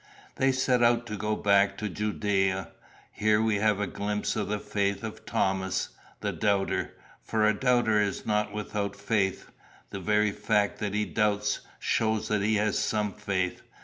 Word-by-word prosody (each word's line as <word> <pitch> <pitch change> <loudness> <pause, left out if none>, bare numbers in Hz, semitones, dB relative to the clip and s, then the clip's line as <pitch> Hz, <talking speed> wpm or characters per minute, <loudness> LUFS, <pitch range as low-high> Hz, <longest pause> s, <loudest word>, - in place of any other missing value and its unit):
"They 135 0 +3
set 130 -1 +2
out 120 0 +3
to 105 -2 -5
go 105 +1 -1
back 100 -1 +3
to 105 - -3
Judæa. 95 -2 0 0.4
Here 105 0 +2
we 110 -1 +2
have 105 0 +2
a 105 - 0
glimpse 105 +2 -2
of 110 - -1
the 105 - -1
faith 100 0 -1
of 110 -1 -7
Thomas, 95 -1 0 0.3
the - - -1
doubter. 100 -2 0 0.3
For 110 -1 +1
a 110 - +4
doubter 120 -4 +3
is 100 -2 -2
not 105 0 0
without 105 -1 -3
faith. 100 -1 -1 0.4
The 100 - -5
very 105 +2 +2
fact 105 -1 0
that 105 -1 -2
he 105 0 +1
doubts, 105 -1 0 0.2
shows 110 -1 0
that 105 -2 +1
he 110 +2 +2
has 105 -1 +1
some 105 -2 0
faith. 95 -3 -2
105 Hz, 170 wpm, -28 LUFS, 100-110 Hz, 0.4 s, a